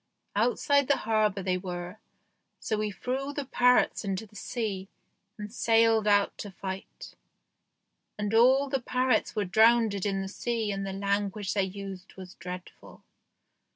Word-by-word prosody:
Outside 255 +5 +2
the 280 - +3
harbour 215 -3 +1
they 185 -1 0
were, 180 +1 -6 0.6
so 220 - -1
we 215 0 -1
threw 265 +7 -3
the 285 -1 -4
parrots 250 -2 +3
into 195 +1 -3
the 210 - -21
sea 200 -3 -4 0.5
and 210 0 -7
sailed 225 -2 +3
out 205 -1 +3
to 205 - -5
fight. 190 0 -8 1.0
And 210 0 -2
all 260 +5 +5
the 270 -1 -1
parrots 250 -2 +1
were 210 -2 0
drownded 220 0 +4
in 195 -1 -1
the - - -5
sea 225 +1 -2
and 195 0 -3
the - - -3
language 200 0 -1
they 200 - +2
used 190 -1 -8
was 185 -1 -10
dreadful." 180 -2 -10
210 Hz, 150 wpm, -28 LUFS, 195-230 Hz, 1.0 s, all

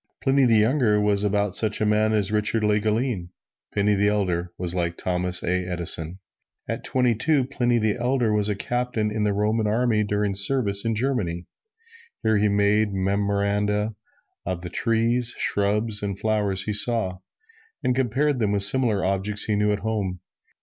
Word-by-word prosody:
Pliny 135 0 +2
the 115 -2 +4
Younger 110 -1 +3
was 105 -1 +1
about 105 -1 0
such 110 -2 +1
a 110 - +1
man 105 +1 +2
as 105 -2 +1
Richard 105 +1 +1
Le 105 0 +2
Gallienne; 110 -3 -1 0.4
Pliny 105 0 +1
the 100 0 +2
Elder 90 -4 -1
was 90 -1 -1
like 85 -2 -2
Thomas 90 0 +1
A. 90 +1 0
Edison. 85 -1 -2 0.5
At - - -4
twenty 125 -2 +1
two, 140 +5 +1
Pliny 120 -3 0
the 110 -1 0
Elder 120 -2 0
was 105 0 0
a 105 - 0
Captain 120 -1 -2
in 105 0 -1
the 105 - +1
Roman 105 +2 0
Army 110 0 +1
doing 105 -1 -1
service 100 -1 0
in 115 -1 0
Germany. 105 -9 -2 0.8
Here 110 -1 +2
he 105 +1 +2
made 100 +1 +2
memoranda 100 +2 0 0.5
of 90 -1 -4
the 90 - -7
trees, 115 +1 +1
shrubs 105 +1 -1
and 100 -2 -3
flowers 105 -3 0
he 105 - -3
saw, 105 -4 0 0.6
and 125 - +1
compared 130 +2 0
them 105 -3 0
with 100 -1 +2
similar 110 -3 +3
objects 100 +2 0
he 105 - 0
knew 105 0 +1
at 105 - -2
home. 100 -5 -3
105 Hz, 170 wpm, -24 LUFS, 100-115 Hz, 0.8 s, the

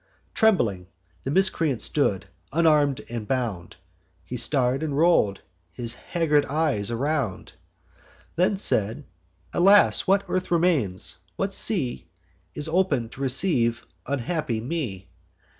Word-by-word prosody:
Trembling 115 - +1 0.4
the - - -4
miscreant 165 -6 +2
stood, 105 -10 0 0.3
unarm'd 150 -3 +2
and 115 -3 -6
bound; 115 -10 -3 0.5
He - - -7
star'd, 130 -1 0
and 150 -3 -3
roll'd 155 - +3 0.3
his 115 +4 -3
haggard 150 +1 0
eyes 140 -8 0
around, 130 -4 -2 0.8
Then 185 +3 +1
said: 110 - +2 0.5
'Alas! 200 +4 +5
what 195 +1 +3
earth 185 0 -2
remains, 130 - 0 0.2
what 195 - -2
sea 135 - 0 0.5
Is 150 - -3
open 160 -9 0
to 130 - -11
receive 130 -4 +1 0.2
unhappy 135 -2 -2
me? 115 - -5
140 Hz, 110 wpm, -24 LUFS, 115-170 Hz, 0.8 s, Alas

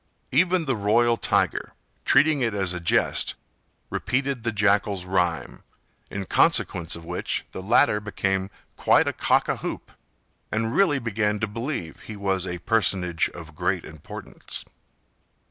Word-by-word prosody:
Even 175 +4 +3
the 135 -3 0
royal 115 +3 +3
tiger, - - 0 0.3
treating 145 +1 +4
it 115 -4 0
as 95 -3 0
a 90 - -3
jest, 85 - +1 0.6
repeated 135 0 -1
the 115 0 -1
Jackal's 100 -2 +1
rime, 90 -3 -1 0.5
in 100 -1 -4
consequence 85 -2 +2
of 85 0 -9
which 90 +1 -3
the - - -6
latter 105 +1 +4
became 95 -2 -1 0.3
quite - - +4
a - - 0
cock - - +2
a - - 0
hoop, - - -6 0.6
and 115 +2 -1
really 175 -8 +4
began 105 -4 -1
to 110 - +1
believe 115 - -5
he 110 - -9
was 95 -2 -1
a 90 - -3
personage 90 -6 +2
of 80 -2 -10
great 90 +1 -1
importance. 80 -2 -7
105 Hz, 145 wpm, -25 LUFS, 90-115 Hz, 0.6 s, treating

